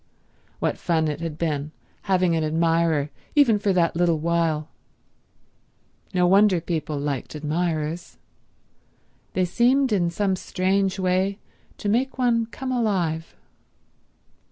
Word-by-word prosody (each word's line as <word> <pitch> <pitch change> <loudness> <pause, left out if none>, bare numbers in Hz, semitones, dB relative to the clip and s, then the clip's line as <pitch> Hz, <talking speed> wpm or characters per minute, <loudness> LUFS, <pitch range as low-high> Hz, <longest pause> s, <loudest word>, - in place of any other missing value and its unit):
What - - -1
fun 160 -2 +1
it 150 -1 -3
had 165 -2 -4
been, 150 -3 -2 0.4
having 180 -3 +3
an 160 - 0
admirer 165 -2 +1 0.2
even 245 -8 +5
for 200 -1 +1
that 175 -3 +2
little 170 -1 +2
while. 160 -1 0 1.4
No 180 -2 +2
wonder 195 0 +5
people 160 -3 -3
liked 140 0 -3
admirers. 155 +1 -2 1.2
They 185 - +1
seemed, 250 +8 +2
in 180 -5 +2
some 190 +2 0
strange 190 +1 0
way, 190 +1 0 0.4
to - - -5
make 250 +7 0
one 235 -3 +2
come 255 +3 -5
alive. 185 -10 -1
175 Hz, 120 wpm, -24 LUFS, 160-200 Hz, 1.4 s, even